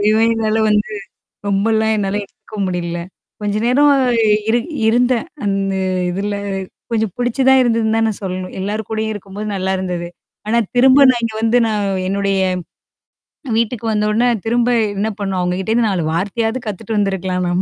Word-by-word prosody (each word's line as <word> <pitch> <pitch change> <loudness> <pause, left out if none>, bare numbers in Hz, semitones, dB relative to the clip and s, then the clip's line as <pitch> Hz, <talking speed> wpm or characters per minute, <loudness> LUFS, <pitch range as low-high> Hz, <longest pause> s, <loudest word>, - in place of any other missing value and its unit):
ஐயோ! 215 +1 +3 0.2
என்னால 220 -1 0
வந்து, 210 +1 +1 0.6
ரொம்பலாம் 220 +2 +2
என்னால 200 -1 -1
எடுத்துக்க 215 - -14
முடியல. 175 -1 -3 0.4
கொஞ்ச 205 0 -1
நேரம் 280 +4 +4 0.6
இரு 235 +2 +3 0.3
இருந்தேன், 245 +3 +2 0.2
அந்த 195 -1 0 0.4
இதுல 200 +3 -2 0.6
கொஞ்சம் 220 -3 0
புடிச்சு 245 +2 -1
தான் 265 0 +6
இருந்ததுன்னு 225 -2 +1
தான் 225 - +2
நான் 215 - -3
சொல்லணும். 185 -1 -4
எல்லார் 205 +2 -3
கூடயும் 220 0 -2
இருக்கும்போது 205 +1 -7
நல்லா 190 0 -1
இருந்தது. 180 -2 -3 0.4
ஆனா, 230 +2 +2 0.2
திரும்ப 265 +3 +6
நான் 240 - -2
இங்க 225 -1 -2
வந்து 225 +2 +3
நான் 210 -2 0 0.2
என்னுடைய 195 0 0 1.2
வீட்டுக்கு 230 0 -1
வந்த 210 -1 +1
உடனே 230 +4 +2 0.2
திரும்ப 240 +1 +1 0.3
என்ன 205 +2 0
பண்ணும் 195 -2 -2
அவங்ககிட்டேருந்து 190 +6 0
4 185 -4 0
வார்த்தையாவது 225 +7 -1
கத்துட்டு 215 +2 -4
வந்திருக்கலாம் 190 -2 0
நாம 175 +1 +1
210 Hz, 150 wpm, -18 LUFS, 195-225 Hz, 1.2 s, தான்